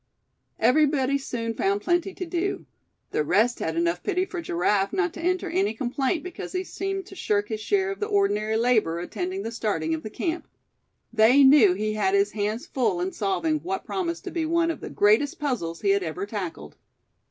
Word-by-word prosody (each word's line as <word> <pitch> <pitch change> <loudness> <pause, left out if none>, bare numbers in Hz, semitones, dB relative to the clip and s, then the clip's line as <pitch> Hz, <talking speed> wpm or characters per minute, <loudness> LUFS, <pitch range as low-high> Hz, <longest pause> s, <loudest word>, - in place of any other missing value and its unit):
Everybody 280 -1 +3
soon 230 -4 -3
found 200 -1 0
plenty 350 - +1
to 365 - -4
do. 350 +3 -2 0.5
The 150 - +1
rest 225 +10 +2
had 160 - -2
enough 170 +1 0
pity 370 -2 0
for 365 -2 -5
Giraffe 195 - +1
not 380 -2 0
to 335 - -8
enter 365 +2 0
any 200 +3 0
complaint 265 +6 -1
because 365 +1 -7
he 370 0 -1
seemed 390 0 -4
to 385 - -12
shirk 205 - 0
his 220 -1 -3
share 385 - +1
of 390 - -6
the 420 - -1
ordinary 220 - +1
labor 225 -8 +2
attending 360 - -4
the 225 - -4
starting 200 -9 -1
of 160 - -2
the 215 - -6
camp. 335 +9 -3 0.7
They 235 +5 +6
knew 265 -9 +7
he 215 +2 -1
had 380 - +1
his 400 0 +2
hands 215 +6 -2
full 225 - 0
in 180 +2 -1
solving 305 - 0
what 375 +4 -4
promised 340 -3 -3
to 370 - -6
be 335 - -1
one 335 +1 +1
of - - -8
the - - -6
greatest 215 +8 +3
puzzles 230 - -3
he 200 - +3
had 200 0 +2
ever 180 +3 -4
tackled. 185 - -6
250 Hz, 200 wpm, -25 LUFS, -, 0.7 s, knew